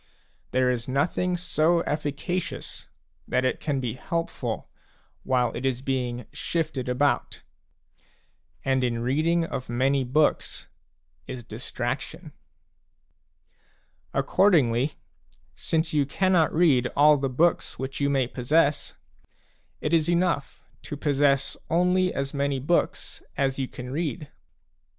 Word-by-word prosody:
There 130 Hz, 0 st, +2 dB
is 120 Hz, -2 st, -3 dB
nothing 175 Hz, +7 st, 0 dB
so 170 Hz, -1 st, +2 dB
efficacious 150 Hz, -, -3 dB, 0.4 s
that 130 Hz, -, +1 dB
it 130 Hz, -, 0 dB
can 145 Hz, -3 st, -1 dB
be 120 Hz, -4 st, -2 dB
helpful 165 Hz, +6 st, -3 dB, 0.5 s
while 125 Hz, -2 st, +1 dB
it -, -, -4 dB
is 130 Hz, -1 st, -1 dB
being 125 Hz, -3 st, -2 dB
shifted 150 Hz, -7 st, -2 dB
about. 140 Hz, +3 st, 0 dB, 1.2 s
And 130 Hz, -1 st, +2 dB
in 120 Hz, -1 st, -1 dB
reading 160 Hz, +6 st, +2 dB
of 135 Hz, -6 st, -5 dB
many 135 Hz, +3 st, +2 dB
books 145 Hz, +5 st, 0 dB, 0.6 s
is 130 Hz, -2 st, -6 dB
distraction. -, -, -5 dB, 1.8 s
Accordingly, 145 Hz, -, +3 dB, 0.6 s
since 160 Hz, 0 st, -1 dB
you 145 Hz, -2 st, +2 dB
cannot 180 Hz, +1 st, +2 dB
read 145 Hz, -7 st, +4 dB
all 150 Hz, +1 st, +6 dB
the 135 Hz, -1 st, -1 dB
books 165 Hz, +7 st, +1 dB
which 135 Hz, +1 st, -4 dB
you 140 Hz, -, +2 dB
may 135 Hz, -2 st, +2 dB
possess, 145 Hz, +5 st, +1 dB, 0.9 s
it 150 Hz, -, -1 dB
is 165 Hz, -1 st, +3 dB
enough 170 Hz, -5 st, 0 dB, 0.2 s
to 145 Hz, -, -6 dB
possess 140 Hz, -1 st, +2 dB
only 180 Hz, +2 st, +3 dB
P -, -, -3 dB
as 135 Hz, 0 st, -2 dB
many 140 Hz, -1 st, 0 dB
books 160 Hz, +7 st, -1 dB, 0.2 s
as 135 Hz, -1 st, 0 dB
you 130 Hz, -, -1 dB
can 125 Hz, 0 st, -8 dB
read. 155 Hz, 0 st, -3 dB
140 Hz, 120 wpm, -26 LUFS, 130-165 Hz, 1.8 s, all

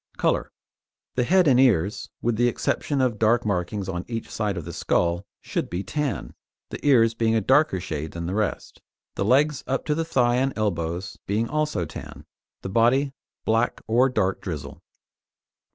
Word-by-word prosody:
COLOUR -, -, 0 dB, 0.6 s
The 125 Hz, -, +1 dB
head 185 Hz, +3 st, +4 dB
and 130 Hz, -3 st, +5 dB
ears, 105 Hz, -7 st, +2 dB
with 120 Hz, -1 st, +1 dB
the 120 Hz, +2 st, +3 dB
exception 135 Hz, +3 st, -1 dB
of 120 Hz, -5 st, 0 dB
dark 115 Hz, +2 st, +3 dB
markings 100 Hz, 0 st, -1 dB
on 90 Hz, -2 st, -3 dB
each 115 Hz, -1 st, -5 dB
side 105 Hz, -3 st, -1 dB
of 85 Hz, -, -5 dB
the 85 Hz, -, -6 dB
skull, 85 Hz, +4 st, 0 dB
should -, -, -3 dB
be 90 Hz, +3 st, -3 dB
tan, 145 Hz, +6 st, -3 dB, 0.4 s
the -, -, -7 dB
ears 115 Hz, -6 st, +5 dB
being 115 Hz, 0 st, +1 dB
a -, -, +4 dB
darker 130 Hz, -1 st, +3 dB
shade 80 Hz, -3 st, -5 dB
than 85 Hz, 0 st, -5 dB
the 90 Hz, -, -3 dB
rest, 105 Hz, 0 st, -2 dB, 0.3 s
the -, -, -2 dB
legs 140 Hz, +6 st, +3 dB
up 135 Hz, 0 st, -1 dB
to 150 Hz, -, +1 dB
the 165 Hz, +2 st, 0 dB
thigh 125 Hz, -6 st, +2 dB
and 135 Hz, +1 st, +1 dB
elbows 90 Hz, -3 st, -2 dB
being 110 Hz, +4 st, 0 dB
also 150 Hz, -, -1 dB
tan, -, -, -9 dB, 0.4 s
the -, -, -3 dB
body 125 Hz, +7 st, +3 dB, 0.3 s
black 115 Hz, +2 st, +1 dB
or 120 Hz, +4 st, +3 dB
dark 95 Hz, -6 st, 0 dB
grizzle. 80 Hz, -7 st, -6 dB
115 Hz, 175 wpm, -24 LUFS, 95-130 Hz, 0.6 s, and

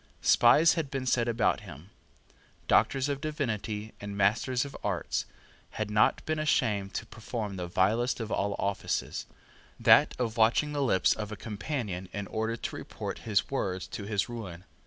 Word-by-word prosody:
Spies 150 Hz, +7 st, +6 dB
had 160 Hz, -4 st, -2 dB
been 135 Hz, -1 st, -3 dB
set 120 Hz, -2 st, +2 dB
about 115 Hz, 0 st, +2 dB
him. 90 Hz, -2 st, -12 dB, 0.8 s
Doctors 135 Hz, 0 st, +3 dB
of 140 Hz, -1 st, -2 dB
Divinity 110 Hz, -8 st, -3 dB
and 100 Hz, 0 st, -6 dB
Masters 120 Hz, +6 st, +2 dB
of 140 Hz, -, -9 dB
Arts 95 Hz, -5 st, -1 dB, 0.5 s
had 110 Hz, -1 st, -2 dB
not 105 Hz, 0 st, +3 dB
been 155 Hz, 0 st, -1 dB
ashamed 110 Hz, -10 st, +1 dB
to -, -, -3 dB
perform 110 Hz, -2 st, -5 dB
the 90 Hz, -2 st, -4 dB
vilest 110 Hz, +9 st, +1 dB
of 115 Hz, -2 st, -4 dB
all 100 Hz, 0 st, 0 dB
offices, 100 Hz, 0 st, -2 dB, 0.5 s
that -, -, +6 dB
of 120 Hz, -2 st, -2 dB
watching 120 Hz, +7 st, +3 dB
the 145 Hz, -, -1 dB
lips 105 Hz, -9 st, +3 dB
of 105 Hz, -1 st, -5 dB
a -, -, -4 dB
companion 105 Hz, -, -4 dB
in 100 Hz, -1 st, -3 dB
order 110 Hz, +3 st, -2 dB
to -, -, -5 dB
report -, -, -6 dB
his 105 Hz, +4 st, +1 dB
words 95 Hz, -9 st, -2 dB
to 100 Hz, -, -6 dB
his 105 Hz, -1 st, 0 dB
ruin. 95 Hz, -8 st, -7 dB
110 Hz, 165 wpm, -29 LUFS, 100-125 Hz, 0.8 s, Spies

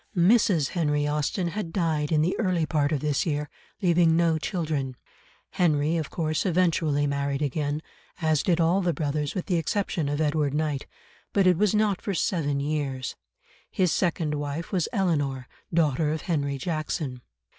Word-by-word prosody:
Mrs. 175 Hz, -, +4 dB
Henry 150 Hz, -4 st, 0 dB
Austen 150 Hz, +5 st, -1 dB
had 175 Hz, -2 st, -4 dB
died 160 Hz, -4 st, 0 dB
in 155 Hz, -1 st, +3 dB
the 180 Hz, -, +1 dB
early 180 Hz, -6 st, +1 dB
part 150 Hz, -2 st, +1 dB
of 145 Hz, -4 st, 0 dB
this 150 Hz, -2 st, +1 dB
year, 150 Hz, -2 st, -2 dB, 0.3 s
leaving 170 Hz, -2 st, +4 dB
no 165 Hz, -2 st, +2 dB
children. 150 Hz, -8 st, -2 dB, 0.5 s
Henry, 155 Hz, -2 st, +2 dB
of 160 Hz, -3 st, -2 dB
course, 155 Hz, -2 st, -1 dB
eventually 165 Hz, -5 st, +2 dB
married 140 Hz, 0 st, -1 dB
again, 145 Hz, +2 st, -1 dB, 0.4 s
as 155 Hz, -3 st, +2 dB
did 175 Hz, -2 st, +1 dB
all 170 Hz, +4 st, +3 dB
the 175 Hz, -3 st, 0 dB
brothers 150 Hz, -1 st, -2 dB
with 185 Hz, -, -2 dB
the 180 Hz, -, +1 dB
exception 165 Hz, -3 st, -1 dB
of 145 Hz, +1 st, -1 dB
Edward 150 Hz, -2 st, +1 dB
Knight, 150 Hz, -3 st, -1 dB, 0.5 s
but 200 Hz, -2 st, +3 dB
it 180 Hz, -1 st, +5 dB
was 210 Hz, +3 st, +2 dB
not 210 Hz, -3 st, +2 dB
for 200 Hz, -, -2 dB
seven 145 Hz, -5 st, 0 dB
years; 140 Hz, -3 st, -2 dB, 0.5 s
his 185 Hz, -3 st, +1 dB
second 165 Hz, -4 st, 0 dB
wife 145 Hz, +2 st, -4 dB
was 185 Hz, -5 st, 0 dB
Eleanor, 145 Hz, -, 0 dB, 0.2 s
daughter 155 Hz, -2 st, +2 dB
of 155 Hz, -, -2 dB
Henry 140 Hz, -5 st, -1 dB
Jackson. 155 Hz, -4 st, -3 dB
155 Hz, 165 wpm, -26 LUFS, 145-175 Hz, 0.5 s, it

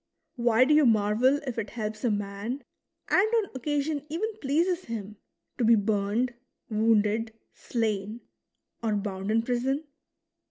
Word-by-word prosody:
Why 240 Hz, 0 st, +4 dB
do 300 Hz, -, +3 dB
you 300 Hz, -3 st, +6 dB
marvel 225 Hz, +5 st, +3 dB
if 245 Hz, -3 st, -3 dB
it 210 Hz, -, -4 dB
helps 215 Hz, -2 st, -5 dB
a 245 Hz, -, +3 dB
man, 205 Hz, +5 st, -3 dB, 0.5 s
and 420 Hz, +4 st, +4 dB
on 440 Hz, -4 st, +1 dB
occasion 290 Hz, +2 st, -1 dB
even 415 Hz, +8 st, -2 dB
pleases 340 Hz, +6 st, +1 dB
him, 215 Hz, -2 st, -6 dB, 0.4 s
to -, -, +2 dB
be 230 Hz, +1 st, +6 dB
burned, 210 Hz, +3 st, 0 dB, 0.4 s
wounded, 220 Hz, 0 st, +2 dB, 0.2 s
slain, 220 Hz, -1 st, -2 dB, 0.6 s
or 220 Hz, -2 st, 0 dB
bound 195 Hz, -1 st, -3 dB
in 225 Hz, +1 st, +2 dB
prison 255 Hz, +5 st, 0 dB
230 Hz, 135 wpm, -27 LUFS, 210-275 Hz, 0.6 s, you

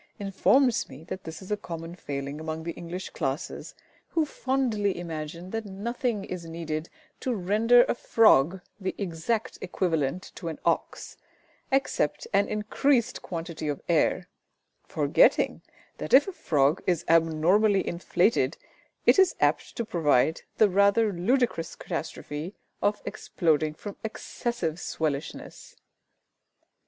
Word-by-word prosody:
informs 230 Hz, +6 st, +2 dB
me 140 Hz, +4 st, -11 dB
that 185 Hz, +3 st, -7 dB
this 160 Hz, +3 st, -7 dB
is 190 Hz, -, -10 dB
a -, -, +3 dB
common 165 Hz, -4 st, -7 dB
failing 140 Hz, -3 st, -5 dB
among 160 Hz, 0 st, -4 dB
the 170 Hz, -, -3 dB
English 175 Hz, +2 st, -7 dB
classes, 135 Hz, +6 st, -4 dB, 0.3 s
who 325 Hz, -2 st, +1 dB
fondly 250 Hz, -9 st, 0 dB
imagine 170 Hz, +1 st, -6 dB
that 225 Hz, 0 st, -2 dB
nothing 215 Hz, +2 st, -2 dB
is 180 Hz, -3 st, -6 dB
needed 165 Hz, -1 st, -4 dB, 0.3 s
to 255 Hz, -2 st, -1 dB
render 220 Hz, +6 st, +5 dB
a -, -, 0 dB
frog 190 Hz, -, +4 dB, 0.2 s
the 190 Hz, -1 st, -3 dB
exact 195 Hz, +4 st, -2 dB
equivalent 175 Hz, -3 st, -1 dB
to 170 Hz, -, -7 dB
an 160 Hz, -, -4 dB
ox 170 Hz, -, -1 dB, 0.5 s
except 270 Hz, -, 0 dB
an 200 Hz, +1 st, +3 dB
increased 235 Hz, +4 st, +1 dB
quantity 165 Hz, -2 st, -5 dB
of 145 Hz, -1 st, -2 dB
air, 170 Hz, +2 st, +2 dB, 0.6 s
forgetting -, -, +3 dB, 0.4 s
that -, -, +3 dB
if 280 Hz, -, +6 dB
a -, -, -3 dB
frog 145 Hz, -, +2 dB
is 175 Hz, -2 st, +1 dB
abnormally 165 Hz, +6 st, +3 dB
inflated, 170 Hz, -, +1 dB, 0.5 s
it -, -, +6 dB
is 380 Hz, -2 st, +5 dB
apt -, -, +1 dB
to 235 Hz, -, -2 dB
provide 160 Hz, -, +2 dB, 0.2 s
the 215 Hz, -, +6 dB
rather 200 Hz, +2 st, +3 dB
ludicrous 215 Hz, -1 st, 0 dB
catastrophe 155 Hz, +7 st, -5 dB, 0.3 s
of 205 Hz, +1 st, 0 dB
exploding 155 Hz, -3 st, 0 dB
from 200 Hz, +5 st, -8 dB
excessive 220 Hz, -5 st, -3 dB
swellishness! 150 Hz, -4 st, -4 dB
180 Hz, 125 wpm, -27 LUFS, 160-215 Hz, 0.6 s, if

